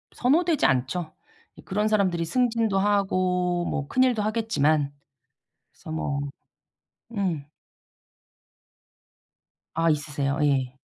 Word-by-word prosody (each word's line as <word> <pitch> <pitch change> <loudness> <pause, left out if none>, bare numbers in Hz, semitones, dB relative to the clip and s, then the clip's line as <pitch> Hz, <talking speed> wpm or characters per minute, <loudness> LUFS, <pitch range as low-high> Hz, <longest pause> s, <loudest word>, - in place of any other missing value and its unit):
선호되지 315 +4 +2
않죠. 135 +6 0 0.4
이 - - -13
그런 210 +3 0
사람들이 185 -6 +1
승진도 230 0 +1
하고 185 -3 +1
뭐 145 -4 -2
큰일도 255 -4 +2
하겠지만 155 -10 +1 0.8
그래서 - - -12
뭐 145 -3 -2 0.9
음. 185 -9 -1 2.3
아 165 0 +2
있으세요. 145 -1 -1
예. 130 -3 +1
180 Hz, 205 characters per minute, -25 LUFS, 150-215 Hz, 2.3 s, 선호되지